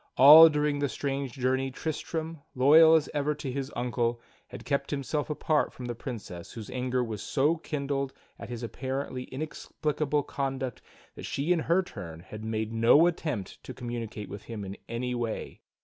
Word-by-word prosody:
All 155 +5 +11
during 150 -1 0
the 145 -1 0
strange 135 +1 -3
journey 130 0 0
Tristram, 160 +2 -4
loyal 155 +5 +7
as 155 -2 +2
ever 150 0 0
to 140 -3 -5
his 135 +1 -4
uncle, 120 -1 -1 0.3
had 125 - -10
kept 140 -1 -1
himself 145 +1 -2
apart 150 0 +1
from 125 - -9
the 120 - -3
Princess 110 -8 -7
whose 110 -3 -8
anger 125 0 0
was 110 -4 -5
so 150 +4 +1
kindled 140 -3 -2 0.3
at - - -8
his 120 -1 -6
apparently 130 +1 -4
inexplicable 150 0 -2
conduct 135 -3 -3 0.3
that - - -8
she 150 +6 +1
in 175 - 0
her 170 +4 +2
turn 85 - -9
had 105 +4 -9
made 110 0 -2
no 115 +8 +6
attempt 150 - -3
to - - -8
communicate 115 -4 -5
with 100 - -8
him 110 -4 -6
in 95 +1 -6
any 125 +2 -2
way. 120 -2 -4
135 Hz, 170 wpm, -28 LUFS, 120-150 Hz, 0.3 s, All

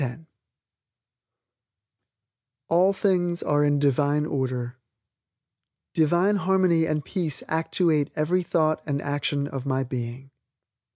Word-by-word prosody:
ALL 180 +4 +4
THINGS 180 -3 0
ARE 145 0 +2
IN 145 0 +2
DIVINE 145 +1 +2
ORDER 130 -4 -3 1.2
"Divine 175 +6 +2
Harmony 185 -3 +2
and 155 -2 -2
Peace 170 -7 -2
Actuate 160 -2 +1
Every 170 +5 +1
Thought 155 -3 0
and 140 -1 -1
Action 145 0 -2
of 135 -1 -6
My 135 0 0
Being." 125 +1 -6
150 Hz, 100 wpm, -25 LUFS, 140-175 Hz, 1.2 s, ALL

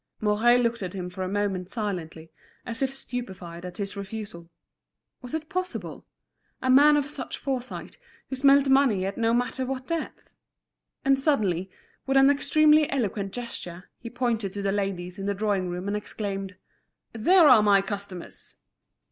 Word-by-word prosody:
Mouret 220 +3 +4
looked 235 -1 0
at 185 -1 -4
him 180 -1 -5
for 190 +1 -7
a 185 - -3
moment 195 -2 -2
silently, 170 -7 -5 0.3
as 230 0 -3
if 270 -1 +1
stupefied 190 -10 -7
at 180 -1 -7
his 200 -1 -4
refusal. 200 -4 -7 0.7
Was 250 +4 -5
it 310 -1 -4
possible?—a 365 -6 -7
man 295 +3 +7
of 290 - +1
such 290 -2 -6
foresight, 260 - -5 0.3
who 265 - -4
smelt 275 +1 +5
money 265 -8 +3
at 195 +1 -3
no 230 0 +1
matter 245 +2 0
what 260 0 -4
depth! 335 +1 -5 0.7
And 270 0 +4
suddenly, 195 - +1 0.4
with 270 0 +3
an 270 +1 +7
extremely 305 +1 +4
eloquent 205 -7 -2
gesture, 185 -7 -7
he 235 - -8
pointed 230 -5 -1
to 200 - -4
the 195 - +1
ladies 195 -3 -3
in 195 - -4
the 200 - 0
drawing 200 -3 0
room 180 +2 -4
and 205 - -1
exclaimed: 200 -2 -4 0.6
"There 330 - +5
are 250 -6 +8
my 200 -2 +4
customers!" 200 -3 -7
215 Hz, 160 wpm, -26 LUFS, 195-265 Hz, 0.7 s, are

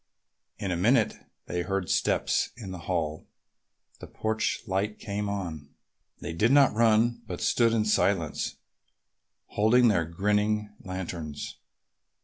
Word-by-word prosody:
In 95 - -3
a - - 0
minute 110 +6 +3 0.3
they 90 - -2
heard 95 0 -2
steps - - +1
in 100 -6 -7
the 90 - -6
hall 80 -4 -1
and - - -35
the - - -9
porch 110 0 -2
light 105 +1 -1
came 105 -1 -3
on. 80 -8 -5 0.5
They - - -5
did 110 +9 +2
not 140 -1 +6
run 115 +1 +3
but - - -5
stood 115 -1 +3
in 110 -2 +1
silence, 95 -6 +1 0.9
holding 120 +3 +4
their 90 -6 +2
grinning 105 +4 0
lanterns. 85 -5 -6
100 Hz, 130 wpm, -28 LUFS, 90-110 Hz, 0.9 s, not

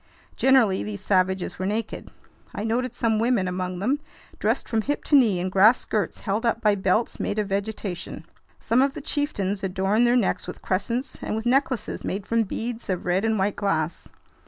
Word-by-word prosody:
Generally 250 -8 +4
these 205 -2 -5
savages 185 -2 +1
were 185 - -1
naked. 215 +2 -3 0.5
I 205 - -3
noted 240 +2 -1
some 225 -3 +1
women 230 -5 +2
among 180 0 -3
them, 255 +10 0 0.4
dressed - - 0
from 225 -1 +1
hip 290 +6 -2
to 295 - +2
knee 225 -9 +5
in 185 +1 -1
grass 210 +6 +6
skirts 210 -2 -2
held 205 +2 -1
up 230 -1 +1
by 210 -3 +3
belts 195 +3 0
made 205 - -2
of 210 -2 -1
vegetation. 195 -5 -4 0.3
Some 230 +3 +2
of 275 0 +1
the - - -5
chieftains 205 -10 -2
adorned 195 +5 +2
their 240 - +4
necks 230 - 0
with - - -8
crescents 230 +8 -2
and - - -3
with 220 +1 -4
necklaces 260 0 0
made 195 +1 -3
from 230 0 +1
beads 230 +3 -5
of 185 -2 -2
red 180 +2 +1
and 220 -1 +1
white 195 +1 0
glass. 165 -5 -1
210 Hz, 190 wpm, -25 LUFS, 190-235 Hz, 0.5 s, grass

